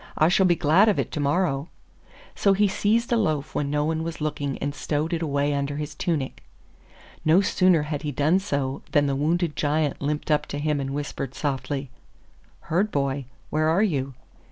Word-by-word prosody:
I 155 - +4
shall 190 +1 +4
be 175 - +4
glad 170 +8 +4
of 205 - +1
it - - -1
to - - -3
morrow.' 145 0 0 0.6
So 200 - +3
he 205 +1 +3
seized 220 +4 +1
a 235 - +4
loaf 155 -9 -1
when 145 -1 -1
no 150 0 0
one 160 0 -1
was 165 0 -5
looking 145 -3 -2
and 145 0 -3
stowed 150 +3 -2
it 170 - -1
away 145 -2 0
under 140 0 -2
his 150 0 -4
tunic. 150 -7 -2 0.8
No 160 +5 +5
sooner 185 -4 +3
had 150 -1 -3
he 150 -1 -3
done 150 +7 +2
so 140 -8 -2
than 145 -1 +4
the 140 -1 0
wounded 160 +3 0
Giant 150 -1 0
limped 150 +2 -2
up 150 - +2
to 145 - -5
him 150 0 0
and 135 -1 -3
whispered 140 -1 -4
softly, 135 -1 -3 0.7
'Herd 190 +7 0
boy, 140 -4 -1 0.3
where 155 +1 +2
are 180 +6 +3
you? 140 - -1
150 Hz, 195 wpm, -25 LUFS, 140-170 Hz, 0.8 s, No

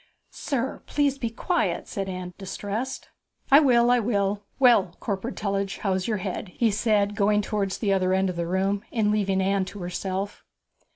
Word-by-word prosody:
'Sir, 265 -2 -3
please 280 -2 +1
be 235 - -1
quiet,' 345 +10 -1
said 195 -1 -4
Anne, 180 -1 -5
distressed. 205 +6 -4 0.4
'I 280 - +10
will, 245 -5 +4
I 245 - +4
will. 205 -3 0 0.2
Well, 235 -9 +4
Corporal 205 +4 -3
Tullidge, 195 -1 -2
how's 190 -2 0
your 220 -2 0
head?' 190 +1 -4
he 230 -2 +2
said, 210 -1 +1
going 210 +1 +2
towards 200 -2 -1
the 200 -3 +1
other 185 -1 +1
end 190 +1 +2
of 180 - -3
the 170 0 -2
room, 195 +3 0
and 215 -3 +1
leaving 195 -2 +1
Anne 195 0 +1
to 205 - -9
herself. 190 +2 -4
200 Hz, 175 wpm, -25 LUFS, 190-230 Hz, 0.4 s, I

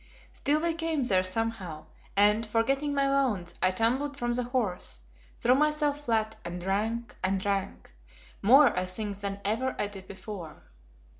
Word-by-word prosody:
Still 295 +2 +1
we 340 -1 +1
came 325 -3 -1
there 190 -6 +3
somehow, 185 -5 -2 0.3
and, 210 +2 +5
forgetting 265 +7 +1
my 275 0 +2
wounds, 240 -11 0
I 185 - +4
tumbled 255 +9 0
from 240 0 -1
the 250 - +1
horse, 225 - -1 0.4
threw 245 - +4
myself 295 0 +1
flat 220 -2 +1
and 175 +1 -5
drank 215 +5 -2
and 190 +1 +1
drank, 195 0 -3 0.5
more, 255 +4 +7
I 180 0 0
think, 200 +1 -4
than 200 0 -3
ever 240 +6 0
I - - +1
did 200 -2 -8
before. 190 -5 -8
225 Hz, 155 wpm, -29 LUFS, 195-270 Hz, 0.5 s, more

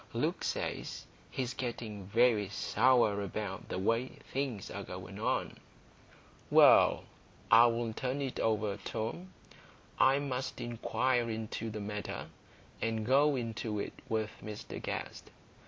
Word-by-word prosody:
Luke - - -1
says - - -3 0.2
he's 125 -2 -3
getting 110 -6 -5
very 110 -2 +3
sour 110 0 +3
about 100 -1 -4
the - - -2
way 115 +7 0 0.2
things 130 -7 -2
are - - -5
going - - -8
on." - - -1 0.9
"Well, - - +7 0.5
I'll 115 0 +5
turn 130 +2 -2
it 135 -2 -3
over, 105 -2 +1
Tom. 120 - -4 0.7
I 135 +1 +6
must 135 -2 -3
inquire 120 +1 0
into 110 0 -4
the 105 -1 -5
matter, 105 0 -5 0.5
and 110 -1 -1
go 140 +4 +4
into 115 -3 -3
it 100 - -3 0.2
with 110 -1 0
Mr 105 -1 -7
Guest. - - -5
115 Hz, 120 wpm, -32 LUFS, 105-125 Hz, 0.9 s, Well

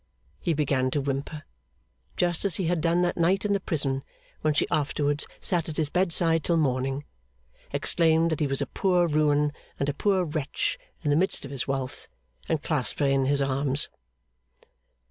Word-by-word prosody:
He 170 - 0
began 135 -3 +1
to 145 - 0
whimper, 140 +3 -3 0.7
just 175 -2 +1
as 200 -4 0
he 190 - -1
had 170 -1 +1
done 170 +2 +2
that 175 - 0
night 185 +4 +2
in 205 - +2
the 200 - +2
prison 135 -6 -1 0.4
when 155 -1 +1
she - - +3
afterwards 145 0 0
sat 170 -3 +1
at 155 - -5
his 150 -2 0
bedside 170 -3 +2
till 170 - +2
morning; 135 -1 0 0.7
exclaimed 165 -1 +3
that 160 - -1
he 150 - +2
was 135 +1 -1
a - - -3
poor 180 +4 +2
ruin 150 -1 +2 0.3
and 140 - 0
a - - 0
poor 190 +4 +2
wretch 150 -3 -2 0.2
in 145 - +1
the - - +4
midst 180 -2 0
of 135 - -8
his 135 -3 -3
wealth; 135 -1 -3 0.4
and 160 -2 0
clasped 150 -6 0
her 145 - +3
in 135 -1 +2
his 140 +1 +2
arms. 135 +1 +1
150 Hz, 185 wpm, -27 LUFS, 140-170 Hz, 0.7 s, the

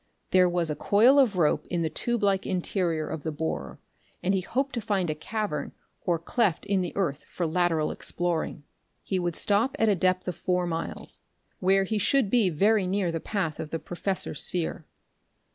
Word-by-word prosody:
There 185 -1 +5
was 175 -3 +2
a - - -2
coil 230 - +5
of 245 -7 +4
rope 160 -4 +2
in 175 -2 -1
the 160 - 0
tube 240 -2 -1
like 195 -1 +2
interior 175 -4 -1
of 155 - -5
the 160 - -3
borer, 75 - -4 0.5
and 190 - +2
he 190 - +1
hoped 270 +8 -2
to 235 - -2
find 190 -6 0
a - - 0
cavern 160 -1 -3 0.3
or 175 -3 +1
cleft 180 +2 0
in 200 -2 +1
the 180 - -3
earth 150 -7 -1
for 175 - -2
lateral 165 -2 +1
exploring. 170 -3 -2 0.4
He 190 - -1
would 175 -2 -2
stop 215 +6 +2
at 225 - +3
a 205 - +4
depth 185 +1 +1
of 180 - -2
four 180 +1 0
miles 165 -1 -3 0.4
where 195 +1 +3
he 215 +2 -1
should 225 +1 +2
be 230 -6 +4
very 200 +4 +2
near 190 -2 0
the 165 - -2
path 170 -4 -2
of 155 - -5
the 165 - -2
professor's 175 0 -3
sphere. 170 -2 -1
180 Hz, 195 wpm, -27 LUFS, 165-200 Hz, 0.5 s, There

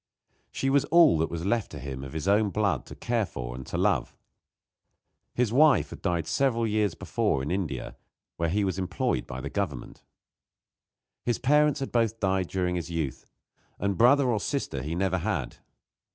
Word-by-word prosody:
She 135 - -1
was 140 0 +4
all 165 - +5
that 80 - +1
was 85 +1 -4
left 115 +1 0
to - - -6
him 65 0 -6
of 65 - -8
his 80 +3 -4
own 105 +1 +3
blood 100 - 0
to - - -9
care 115 -4 -1
for - - -6
and 65 0 -8
to - - -4
love. - - 0 1.2
His 120 -2 +1
wife 150 +1 +4
had - - -9
died 85 -4 0
several 115 - +1
years 105 -5 0
before 65 - -1
in 75 - -3
India, 85 -9 -3 0.4
where 85 0 -1
he 100 +5 +1
was 95 -1 -1
employed 90 -8 -1
by 65 -1 -6
the - - -5
government. 80 -11 -4 1.2
His 120 -2 0
parents 150 +1 +3
had 135 - -3
both 115 -2 +1
died 95 -2 +1
during 90 -1 -1
his 85 0 -5
youth, 80 -6 -4 0.5
and 100 0 -1
brother 130 +6 +5
or 115 -4 +1
sister 100 - -3
he 75 +5 -4
never 95 0 0
had. 80 - -3
95 Hz, 180 wpm, -27 LUFS, 80-115 Hz, 1.2 s, all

